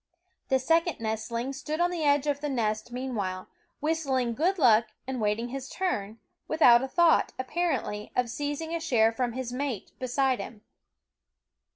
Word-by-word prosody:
The 265 - +4
second 330 +5 +1
nestling 225 +3 -3
stood 300 +3 -4
on 350 +1 +2
the 340 -3 -2
edge 285 -1 +3
of 290 -1 -1
the 295 - -2
nest 215 -3 -1
meanwhile, 215 -8 -3 0.3
whistling 275 -6 0
good 350 +10 +1
luck 235 -6 +5 0.2
and 260 -2 -4
waiting 215 +3 0
his 270 +1 -6
turn, 225 - -2 0.3
without 245 -7 +6
a 265 - -2
thought, 335 +4 +3
apparently, 255 -7 -2
of 250 -1 +2
seizing 290 +6 -4
a 335 - -1
share 235 -9 +3
from 240 +1 -2
his 250 -1 -4
mate 255 -5 -3
beside 260 0 +1
him. 215 -2 -8
260 Hz, 160 wpm, -28 LUFS, 230-300 Hz, 0.3 s, without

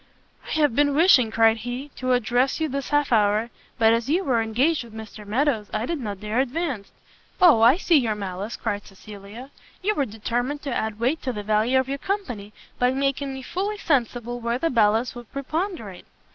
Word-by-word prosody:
"I - - -4
have 295 -6 +2
been 285 0 +3
wishing," 290 -8 +5
cried 225 0 +4
he, 245 +5 -5
"to 255 0 0
address 245 +3 +1
you 320 - 0
this 275 -1 -4
half 290 -2 +1
hour, 215 +1 +2 0.3
but 225 0 +5
as 230 +2 -1
you 350 +6 +2
were 245 -7 +1
engaged 250 +8 +1
with 230 -2 -13
Mr 215 -1 -9
Meadows, 230 -2 0
I 215 +2 -1
did 330 +3 -3
not 205 -6 -5
dare 215 +3 -2
advance." 270 - -2 0.5
"O, 335 -11 +6
I 240 +7 +6
see 345 -4 +3
your 230 -6 +1
malice!" 195 +1 -5
cried 205 -2 -3
Cecilia; 205 +6 -11 0.3
"you 425 +3 +2
were 285 -8 0
determined 240 +6 -3
to 275 - -3
add 220 -2 -2
weight 260 +8 0
to 260 - -2
the 210 -3 -5
value 215 +5 +2
of 260 - -1
your 275 +1 -3
company, 250 - -4 0.3
by 250 - +3
making 275 +1 -1
me 265 0 -7
fully 400 +8 -3
sensible 245 - -1
where 235 0 -1
the 330 +5 0
balance 225 0 +2
would 240 -2 -11
preponderate." 275 - -4
245 Hz, 200 wpm, -24 LUFS, 220-280 Hz, 0.5 s, O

